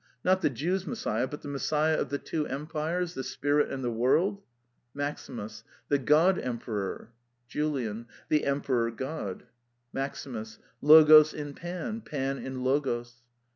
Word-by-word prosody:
Not 185 +1 +3
the - - +3
Jews' 175 +9 -2
Messiah, 130 - -1
but 150 - -8
the - - -7
Messiah 150 +2 +1
of - - -2
the 140 - -1
two 150 +1 -3
empires, 160 +5 -2
the 135 - -4
spirit 145 +2 +1
and 135 -1 -4
the 120 - 0
world? 165 - +2 0.5
MAXIMUS. 125 -6 -5 0.3
The 145 - +3
God 160 +8 +4
Emperor. 115 -3 -4 0.4
JULIAN. 120 -7 -2 0.2
The 150 -1 +2
Emperor 135 -4 +1
God. 115 - -5 0.5
MAXIMUS. 120 -5 -5 0.2
Logos 155 0 +8
in 145 -1 -5
Pan, 180 - -5
Pan 135 -6 -3
in 130 -1 -5
Logos. 120 -3 -1
145 Hz, 135 wpm, -29 LUFS, 125-155 Hz, 0.5 s, Logos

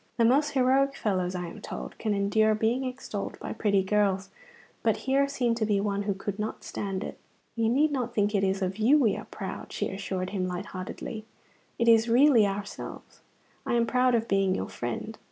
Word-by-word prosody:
The 230 - +4
most 275 +6 +3
heroic 270 +1 +3
fellows, 185 -3 -1
I 180 -1 -3
am 170 - -9
told, - - -7
can 215 -2 0
endure 215 +2 +3
being 230 +5 0
extolled 250 -5 -5
by - - -5
pretty 200 -3 +2
girls, 195 -1 +1 0.5
but - - +2
here 275 +1 +3
seemed 245 -4 0
to 220 - +1
be 205 -2 +2
one 200 0 -1
who 200 -1 -1
could 195 +1 -5
not 215 +1 -4
stand 195 -1 -4
it. - - -7 0.4
"You 225 -1 +1
need 290 +6 +3
not 245 -4 -2
think 205 0 +2
it 200 -2 +2
is 195 0 +1
of 190 +1 -2
you 250 +8 +5
we 230 -9 +3
are - - -7
proud," - - -7
she - - -2
assured 190 -1 -3
him 185 -3 -1
light 180 0 -4
heartedly; 205 +4 -6 0.5
"it 235 - +1
is 230 0 +5
really 240 -3 +6
of 195 - -1
ourselves. 205 0 -8 0.4
I - - 0
am 235 0 +3
proud 250 +1 +3
of 230 0 0
being 195 -1 +2
your 95 - -3
friend. - - -5
215 Hz, 210 wpm, -28 LUFS, 195-240 Hz, 0.5 s, really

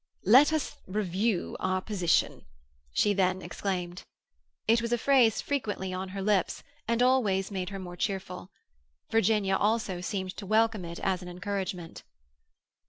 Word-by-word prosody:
"Let 260 +10 +7
us 315 -3 -2
review 195 +1 -1
our 185 0 0
position," 185 -4 0 0.5
she 205 - +2
then 185 -1 +1
exclaimed. 180 -2 -3 0.7
It 230 +1 +4
was 235 0 -3
a 240 - +3
phrase 245 -3 +4
frequently 205 -9 -2
on 185 +1 -4
her 195 +1 -5
lips, 200 -3 +1 0.2
and 235 +1 +2
always 215 -7 +2
made 185 -2 -3
her 200 - -6
more 180 -2 -7
cheerful. 185 -1 -4 0.6
Virginia 210 -3 +2
also 210 -3 0
seemed 185 0 -3
to 205 - -6
welcome 220 -2 +2
it 170 0 -7
as 190 -2 0
an 180 - -9
encouragement. 180 -2 -4
195 Hz, 145 wpm, -29 LUFS, 185-220 Hz, 0.7 s, Let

